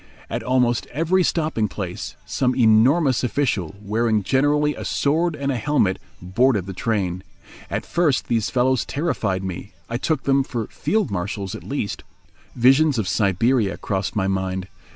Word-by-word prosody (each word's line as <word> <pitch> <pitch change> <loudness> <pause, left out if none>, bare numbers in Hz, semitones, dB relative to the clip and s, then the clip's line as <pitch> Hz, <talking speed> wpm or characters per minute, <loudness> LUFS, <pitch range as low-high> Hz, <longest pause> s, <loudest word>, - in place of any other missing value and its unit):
At - - -2
almost 125 -2 +1
every 165 +6 +1
stopping 155 -11 0
place 90 - -6
some 130 -1 0
enormous 130 +5 +4
official, 115 - -1
wearing 110 +1 0
generally 145 +5 +2
a - - -7
sword 160 +3 +1
and 140 -1 -2
a 130 - -1
helmet, 120 -8 +1 0.2
boarded 100 +3 +1
the 95 - -6
train. 95 -3 -1 0.5
At - - -3
first 155 -7 +1
these 115 -3 0
fellows 130 0 +2
terrified 105 - -2
me. 95 +2 -6 0.2
I 120 - 0
took 150 +2 -1
them 135 0 +3
for 120 -4 -4
field 215 -2 -1
marshals 100 +1 -3
at - - -8
least. 135 -7 -3 0.5
Visions 135 +4 +4
of 105 -4 -1
Siberia 100 +3 +1
crossed 95 -1 -3
my 95 -2 +1
mind. 95 -1 -2
120 Hz, 150 wpm, -22 LUFS, 100-140 Hz, 0.5 s, enormous